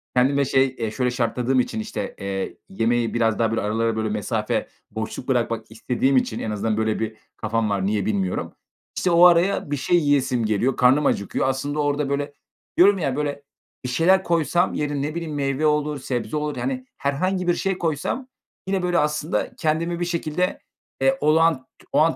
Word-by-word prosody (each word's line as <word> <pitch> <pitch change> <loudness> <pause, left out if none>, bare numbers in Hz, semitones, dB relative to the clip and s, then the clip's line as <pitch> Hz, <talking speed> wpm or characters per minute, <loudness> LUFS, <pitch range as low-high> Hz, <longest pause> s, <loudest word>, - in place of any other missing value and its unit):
kendime, 140 +3 +3
şey, 130 0 +2
eee, 110 -2 -2
şöyle 125 +3 0
şartladığım 125 +1 0
için 120 - -1
işte, 110 - -5
eee, 100 -1 -4
yemeği 115 +3 0
biraz 115 -2 +1
daha 115 -1 +2
böyle 115 - 0
aralara 115 +2 0
böyle 110 0 -1
mesafe 105 +1 -1 0.2
boşluk 110 +3 -5
bırakmak 115 -3 0
istediğim 125 +4 +1
için 110 -3 0
en 110 - -3
azından 105 +1 -1
böyle 110 -1 0
bir 110 -1 -3 0.2
kafam 110 0 -1
var. 100 -2 0
Niye 105 -1 0
bilmiyorum. 100 -4 -1 0.4
İşte, 180 - +1
o 170 +1 +7
araya 175 -2 +4
bir 145 - 0
şey 175 +6 +2
yiyesim 140 -6 +2
geliyor. 110 +5 +1
Karnım 130 +4 +4
acıkıyor. 100 +3 0
Aslında 140 +3 -2
orada 145 -1 0
böyle 145 +1 -2 0.4
diyorum 200 +3 +6
ya; 140 -7 -1
böyle 145 -1 -3 0.4
bir - - -2
şeyler 180 +9 +3
koysam, 170 +1 +1
yerin 145 -1 -2
ne 150 +2 -3
bileyim, 165 -3 -4
meyve 140 +1 0
olur, 150 -1 +1
sebze 130 +3 -3
olur, 150 -1 -2
yani, 255 -1 -3
herhangi 180 +7 -1
bir 175 - +4
şey 195 +1 -1
koysam 170 - -2 0.4
yine 190 -1 0
böyle 175 -1 +2
aslında 150 +2 -1
kendimi 165 +2 -1
bir 175 - 0
şekilde, 170 +1 -1 0.4
eee, 270 0 +3
olağan 155 -3 +3 0.2
o 145 - +3
an 160 +1 +4
140 Hz, 180 wpm, -23 LUFS, 115-160 Hz, 0.4 s, o